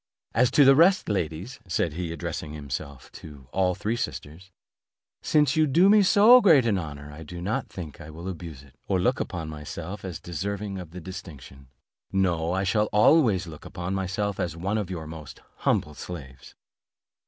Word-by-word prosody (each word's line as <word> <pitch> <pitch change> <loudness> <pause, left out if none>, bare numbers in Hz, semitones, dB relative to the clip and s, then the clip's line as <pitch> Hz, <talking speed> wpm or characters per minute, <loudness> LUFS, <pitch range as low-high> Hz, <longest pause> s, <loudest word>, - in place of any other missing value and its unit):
As 125 +2 +4
to 145 - +5
the 135 - +8
rest, 180 +6 +4
ladies," 95 - -3
said 85 -2 0
he, 85 0 -4
addressing 75 -1 -5
himself 70 -2 -7
to 70 -4 -12
all 90 -1 +1
the - - -19
three 110 +3 0
sisters, 95 -5 -6 0.7
"since 150 +1 +2
you 155 -1 +3
do 170 +8 +5
me 210 0 +7
so 215 +6 +7
great 155 - +6
an 105 -5 +2
honour, 75 -1 -8
do 85 +3 -8
not 95 +6 -2
think 80 -6 -8
that - - -10
I - - -10
will 85 +4 -8
abuse 85 -6 -7
it, 70 - -19
or 95 - +1
look 125 +9 +1
upon 85 -3 -4
myself 80 +5 -7
as 90 -5 -6
deserving 100 +3 -4
of 90 -3 -8
the 90 +2 -9
distinction. 75 -7 -10 0.4
No, 85 -4 +1
I 95 +1 0
shall 105 +3 +1
always 105 - +4
look 80 -3 -10
upon 90 +2 -5
myself 95 +1 -2
as 85 -2 -2
one 100 +5 -1
of 100 -4 -4
your 85 -4 -5
most 75 -5 -9 0.2
humble 75 - 0
slaves." 65 -6 -9
90 Hz, 185 wpm, -26 LUFS, 80-105 Hz, 0.7 s, the